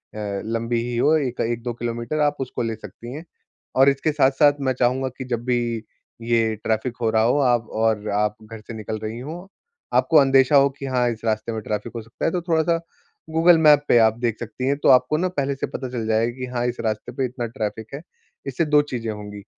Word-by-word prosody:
अ, 100 -2 -4
लम्बी 115 +1 -1
ही 120 -1 -3
हो 150 +6 +4
एक 130 -5 -3
1-2 120 +1 -2
किलोमीटर 120 +5 -3
आप 145 0 +2
उसको 130 -2 -4
ले 115 -1 -2
सकती 110 +3 -10
हैं। 155 +4 -7 0.5
और 135 +1 +6
इसके 140 +3 0
साथ-साथ 145 0 +4
मैं 130 -1 +1
चाहूँगा 130 +2 +1
कि 130 - -5
जब 120 -2 -3
भी 125 -1 +2 0.6
ये 115 -1 +1
ट्रैफ़िक 115 +3 -1
हो 115 - +2
रहा 110 0 +3
हो 125 +5 +3
आप 120 -4 +2
और 110 -1 +1
आप 105 0 +1
घर 110 0 -10
से 115 - -10
निकल 110 0 -5
रहीं 110 +3 -5
हो, 175 +6 -8 0.4
आपको 160 - +4
अंदेशा 135 0 +5
हो 140 0 +6
कि 140 - -5
हाँ 125 -2 +1
इस 110 - -7
रास्ते 110 +1 -1
में 110 - -4
ट्रैफ़िक 105 +3 -4
हो 115 - -4
सकता 115 +1 -6
है 165 - +2
तो 180 - -1
थोड़ा-सा 165 0 +1 0.5
गूगल 165 +1 +5
मैप 150 -2 +5
पे 120 - +5
आप 110 +1 -2
देख 115 -3 -1
सकती 120 +3 -4
हैं 140 - +1
तो - - +5
आपको 130 +3 +5
ना 185 - +1
पहले 140 0 0
से - - -3
पता 130 - -5
चल 120 -3 -4
जाएगा 115 +2 +1
कि 125 - -3
हाँ 120 -1 -1
इस 120 - -4
रास्ते 110 +1 -3
पे 130 +2 -1
इतना 125 -1 -4
ट्रैफ़िक 110 0 -5
है। 145 - -7 0.5
इससे 135 +5 0
2 150 -1 +4
चीज़ें 120 -6 -4
होंगी, 105 -1 -8
120 Hz, 225 wpm, -22 LUFS, 110-140 Hz, 0.6 s, और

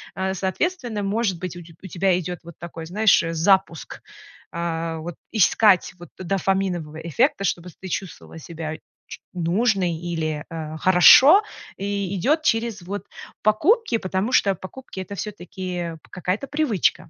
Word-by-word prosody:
э, 190 0 -1
соответственно, 220 - -2
может 200 -2 -1
быть, 180 -1 -5
у 175 - -8
теб 165 0 -17
у 190 - -8
тебя 185 0 +1
идёт 180 0 -5
вот 170 -1 -12
такой, 165 -1 -8
знаешь, 205 +4 +3
э, 165 0 -3
запуск. 170 0 +1 0.5
А, 165 -1 -3
вот 160 +1 -7 0.2
искать, 205 -3 +4
вот, 175 -2 -12
дофаминового 185 -4 -1
эффекта, 195 - 0
чтобы 175 -1 -2
с - - -19
ты 190 - -8
чувствовала 180 -2 -6
себя 160 -1 -6 0.3
ч - - -9
нужной 185 +1 +1
или, 160 -3 -3
э, 160 -2 -6
хорошо, 260 - +8 0.3
и 200 -1 -3
идёт 300 - +2
через, 225 -5 0
вот, 200 +4 -6 0.4
покупки, 300 - +3
потому 190 +5 -2
что 200 -5 +4
покупки- 195 +3 -10
это 190 +2 -6
всё-таки 180 -3 -5 0.2
какая-то 185 - -3
привычка. 280 - 0
185 Hz, 145 wpm, -23 LUFS, 170-205 Hz, 0.5 s, хорошо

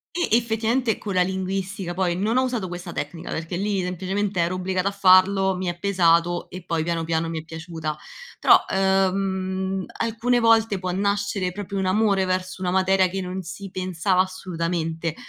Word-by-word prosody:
E 350 - 0
effettivamente 230 +1 0
con 200 -3 -5
la 180 - +4
linguistica, 190 0 -3
poi 180 -2 0
non 215 +6 0
ho 255 - +4
usato 240 -7 -2
questa 175 0 -7
tecnica, 165 +2 -5
perché 165 +2 -4
lì 200 0 0
semplicemente 190 +2 -2
ero 170 +2 0
obbligata 185 +1 -1
a - - -1
farlo, 190 0 +4
mi 185 -1 -3
è 175 - -3
pesato 175 -2 +2
e 185 0 -8
poi 165 -2 0
piano 170 -1 -1
piano 165 0 -1
mi 160 - -3
è 155 - -13
piaciuta, 160 -2 -5 0.4
però, - - +6 0.5
uhm, 190 0 -2
alcune 230 +2 +1
volte 225 -3 +3
può 185 -1 -3
nascere 200 -1 0
proprio 200 +1 -5
un 190 - 0
amore 195 -1 +2
verso 185 0 -2
una 180 -1 -1
materia, 190 0 +3
che 190 +1 -4
non 185 +1 -4
si 185 +2 -8
pensava 185 0 0
assolutamente 170 -3 -2
185 Hz, 175 wpm, -23 LUFS, 175-200 Hz, 0.5 s, però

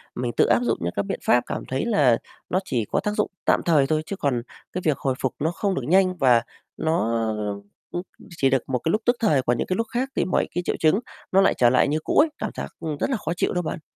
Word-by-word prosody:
mình 120 -1 -2
tự - - +5
áp - - +4
dụng 115 -1 +1
những 85 +1 -2
cái 100 - 0
biện - - -4
pháp, 120 - +4
cảm - - -4
thấy 130 - -2
là 140 - +4 0.3
nó 185 - +2
chỉ 115 -4 -1
có - - -1
tác 210 +1 -1
dụng 210 0 -1
tạm - - +3
thời 150 -5 +4
thôi, 155 +1 0
chứ 200 - -4
còn 135 -9 0 0.3
cái 185 - -2
việc 150 -3 +2
hồi 130 -2 -1
phục 130 - -1
nó 160 +3 0
không 195 +1 -1
được - - -3
nhanh 185 +1 +4
và 125 -5 +5 0.4
nó, 160 -8 0 0.8
ưm, 175 - -2 0.4
chỉ 135 - +3
được 135 -2 +1
một 125 -2 0
cái 160 - 0
lúc 215 - +1
tức 245 +1 +4
thời, 155 - +3
còn 120 -1 0
những - - -2
cái 185 - 0
lúc 230 -1 -1
khác 255 +3 -1
thì - - +1
mọi 185 - +1
cái 175 - +1
triệu - - 0
chứng 160 +6 +4 0.3
nó 195 +1 +5
lại 195 - +4
trở 120 -1 +5
lại 130 - +3
như 155 +2 0
cũ - - -1
ấy, 310 +1 +6
cảm - - -3
giác, - - -4
ưm, 155 -3 -4
rất - - 0
là 260 - 0
khó 165 -3 -3
chịu - - 0
đó 180 - 0
bạn. 155 - -4
155 Hz, 280 wpm, -24 LUFS, 130-190 Hz, 0.8 s, ấy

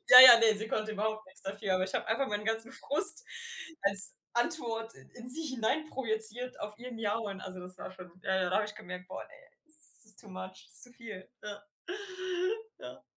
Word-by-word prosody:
Ja, 250 0 +7
ja, 250 -2 +7
ne. 220 -2 -1
Sie 220 +1 -2
konnte 215 0 -7
überhaupt 215 0 -8
nichts 185 - -20
dafür. 195 0 -7
Aber 185 0 -4
ich 190 - -10
habe - - -6
einfach 250 +5 -5
meinen 210 0 -8
ganzen 225 +3 +3
Frust 390 - +7 0.6
als 200 0 +6 0.2
Antwort 235 -4 -6
in 245 0 -9
sie 315 +6 +7
hineinprojeziert 250 -3 +1
auf 210 +1 -12
ihr 250 +1 -14
Miauen. 210 -3 -8
Also, 185 -1 -12
das 180 +1 -8
war - - -12
schon 185 -2 -18
ja, 190 - -5
ja. 180 - -5
Da 185 - -3
habe 215 - -3
ich 210 - -12
gemerkt: 180 0 -14
„Boah, - - -12
ne, - - -26 0.6
das - - -6
ist 215 - -6
too 210 - -16
much. 185 0 -14
Das - - -12
ist - - -5
zu 245 - -17
viel.“ 225 -6 -15
Ja. 205 -1 -14 1.1
Ja, - - -13
ja. - - -19
215 Hz, 210 wpm, -26 LUFS, 195-240 Hz, 1.1 s, Ja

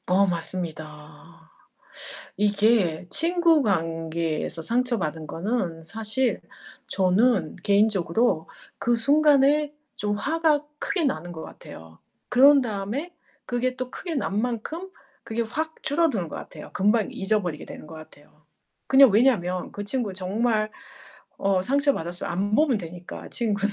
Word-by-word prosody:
어, 190 +2 +4
맞습니다. 165 -2 -6 0.9
이게 205 -4 +2
친구 335 - +3
관계에서 165 -5 -1
상처받은 205 -9 -1
거는 170 -1 -2
사실 225 +8 -1 0.5
저는 195 0 +2
개인적으로 200 -2 +2 0.3
그 240 - +1
순간에 290 +3 +4 0.2
좀 205 0 -1
화가 310 +4 +2 0.2
크게 350 +1 -1
나는 175 - -2
것 160 -2 -8
같아요. 80 0 -12 0.3
그런 275 +3 +7
다음에 235 - -4 0.3
그게 250 +1 -1
또 255 -1 -5
크게 345 +3 -6
난 210 -6 -1
만큼 250 - -4 0.3
그게 230 +1 -2
확 315 +8 -4
줄어드는 285 - +1
것 - - -7
같아요. - - -10
금방 210 +2 +2
잊어버리게 195 -6 -1
되는 - - -10
것 160 - -11
같아요. 155 -1 -15 0.4
그냥 270 -1 +7
왜냐면 200 -5 +2
그 205 - -5
친구 220 -1 -2
정말 215 +3 0 0.7
어 195 -2 +1
상처 280 +6 +2
받았으면 175 +2 -4
안 200 +4 0
보면 290 -2 +3
되니까, 175 -1 -9
친구는. 205 -3 -1
210 Hz, 270 characters per minute, -25 LUFS, 175-255 Hz, 0.9 s, 그런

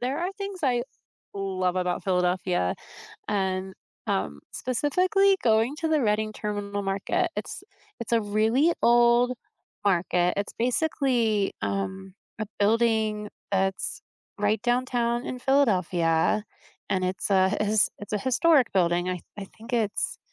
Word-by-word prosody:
there 260 +4 -2
are 355 +3 -1
things 395 -1 -6
I 245 -4 +2 0.5
love 185 -2 -1
about 180 -1 -1
Philadelphia 180 - +1 0.5
and, 190 -2 -1 0.3
um, 70 0 -2
specifically 365 - +2
going 225 +4 +3
to 320 +1 -2
the 310 -1 +2
Reading 215 -1 +1
Terminal 205 -1 -4
Market. 195 0 0
It's - - -5 0.4
it's 235 - -6
a 230 - +4
really 220 +10 +2
old 240 +1 +5 0.5
market, 180 -2 +2
it's 200 - -3
basically, 240 -5 +1
um, 190 -1 -3 0.3
a 215 - -2
building 220 0 +1 0.2
that's 190 -1 -1 0.4
right 210 +1 +1
downtown 240 -1 0
in 255 - -5
Philadelphia 190 - +2 0.5
and 185 -1 +1
it's 185 +2 -2
a 190 0 +3
it's 210 0 +3
it's 205 - -9
a 210 - +1
historic 260 +4 +3
building. 175 -1 +2
I 180 -1 -2 0.2
I 200 - -4
think 230 +3 -11
it's 220 -4 -1
210 Hz, 130 wpm, -26 LUFS, 190-245 Hz, 0.5 s, old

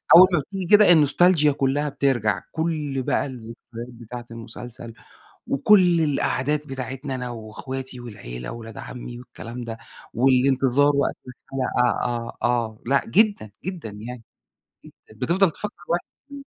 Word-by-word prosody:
أول 185 +2 +10
ما 170 - +4
بتيجي 190 +6 -5
كده 210 -1 +7
النوستالجيا 155 0 +5
كُلّها 140 +2 0
بترجع، 130 -7 0
كل 155 -5 -2
بقى - - +1
الذكريات 120 -2 -9
بتاعة 120 +1 -9
المسلسل، 115 +1 -8 0.6
وكل 175 +3 +5
القعدات 150 0 0
بتاعتنا 135 +1 -5
أنا 125 -1 -4
وإخواتي 125 +3 -6
والعيلة - - -7
وأولاد 115 -1 -9
عمي 120 -1 -8
والكلام 120 0 -8
ده. 115 -1 -6 0.4
والانتظار 135 +2 +3
وقت 140 - +1
الحلقة 125 -1 -1
آه، 120 -1 -3
آه، 115 -3 0
لأ 140 +2 +3
جدًا، 205 - +2
جدًا 175 -9 -5
يعني. 115 +4 -8 0.6
جدًا، - - -15 0.2
بتفضل 170 - +2
تفكّر 210 +7 -6
الواحد 175 +1 0 0.3
إمم. 280 -1 -8
130 Hz, 130 wpm, -24 LUFS, 120-150 Hz, 0.6 s, أول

